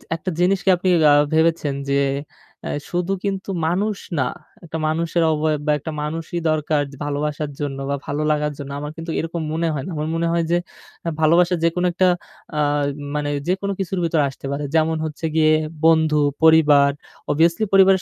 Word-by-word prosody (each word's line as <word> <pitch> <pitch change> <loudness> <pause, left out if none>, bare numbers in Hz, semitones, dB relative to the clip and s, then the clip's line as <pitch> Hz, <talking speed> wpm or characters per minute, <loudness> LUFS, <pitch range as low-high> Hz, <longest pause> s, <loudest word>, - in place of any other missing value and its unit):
একটা 165 +3 -4
জিনিসকে 190 +1 +2
আপনি 180 +2 -3 0.2
আ - - +7 0.2
ভেবেছেন 160 -2 +2 0.2
যে 140 - +2 0.7
আ - - -3 0.2
শুধু 180 +2 -1
কিন্তু 195 -1 -3 0.2
মানুষ 200 +5 0 0.2
না। 130 - +2 0.4
একটা 160 -1 -5
মানুষের 165 +2 0
অবয়ব 155 0 0
বা 150 - +4
একটা 160 +3 -6
মানুষই 160 +3 -4
দরকার 155 -1 +1 0.2
ভালোবাসার 145 +1 -2
জন্য 145 -2 -3
বা 140 - +1
ভালো 145 +1 -2
লাগার 150 0 0
জন্য। 140 -1 -7
আমার 150 +1 -5
কিন্তু 165 0 -5
এরকম 165 +1 -3
মনে 165 +1 0
হয় 140 -3 -3
না। - - -6
আমার 150 0 -2
মনে 170 0 0
হয় 170 0 +1
যে 175 - +4 0.5
আ - - +2
ভালোবাসা 170 +3 +4
যেকোনো 170 +2 +1
একটা 185 +2 +2 0.5
আ - - +1 0.6
মানে 150 -1 -1 0.2
যেকোনো 195 +2 0
কিছুর 190 -1 -2
ভেতরে 165 -2 +2
আসতে 135 - -11
পারে। 140 +1 -3
যেমন 160 0 +2
হচ্ছে 155 +1 -5
গিয়ে 155 -1 +4 0.3
বন্ধু, 160 -2 +4 0.3
পরিবার 150 -3 +6 0.4
অভিয়াসলি 165 +6 +2
পরিবারের 190 -1 +6
160 Hz, 175 wpm, -21 LUFS, 150-175 Hz, 0.7 s, আ